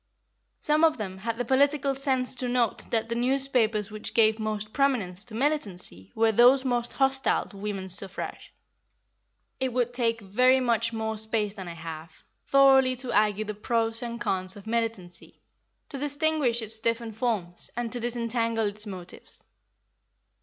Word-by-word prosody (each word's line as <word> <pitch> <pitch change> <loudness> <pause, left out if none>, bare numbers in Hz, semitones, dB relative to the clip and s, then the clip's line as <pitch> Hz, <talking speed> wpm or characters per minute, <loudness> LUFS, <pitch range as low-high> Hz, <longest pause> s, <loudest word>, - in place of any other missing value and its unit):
Some 305 +1 +2
of 320 -1 +4
them 190 -3 -5
had 230 +3 -3
the 245 - -2
political 275 +2 +2
sense 260 -2 0
to 255 -1 -2
note 245 -3 0
that 225 -1 0
the 230 - -2
newspapers 240 -4 +1
which 215 0 -5
gave 220 -1 +4
most 215 -1 -3
prominence 220 -10 +1
to 220 - -7
militancy 200 - -2
were 225 0 +3
those 250 +4 +5
most 240 -2 0
hostile 270 0 +2
to 200 - -13
women's 195 -2 -2
suffrage. 195 0 -3 1.1
It 260 -2 -1
would 245 -1 0
take 230 -2 0
very 250 +7 +3
much 230 -2 +1
more 220 -1 -2
space 220 -2 0
than 190 -4 -8
I 170 - -7
have, 160 0 -9 0.2
thoroughly 270 -2 +5
to 250 -1 -4
argue 210 0 +2
the 215 - -4
pros 225 +2 -1
and 235 -1 -5
cons 185 -4 -2
of 205 - -12
militancy, 220 -6 -3 0.5
to 275 - -6
distinguish 290 -4 0
its 220 0 -1
different 230 0 -1
forms, 210 -7 -2
and 240 -1 -2
to 245 - -4
disentangle 230 -1 -1
its 210 +1 -4
motives. 180 -3 -7
230 Hz, 160 wpm, -27 LUFS, 210-255 Hz, 1.1 s, those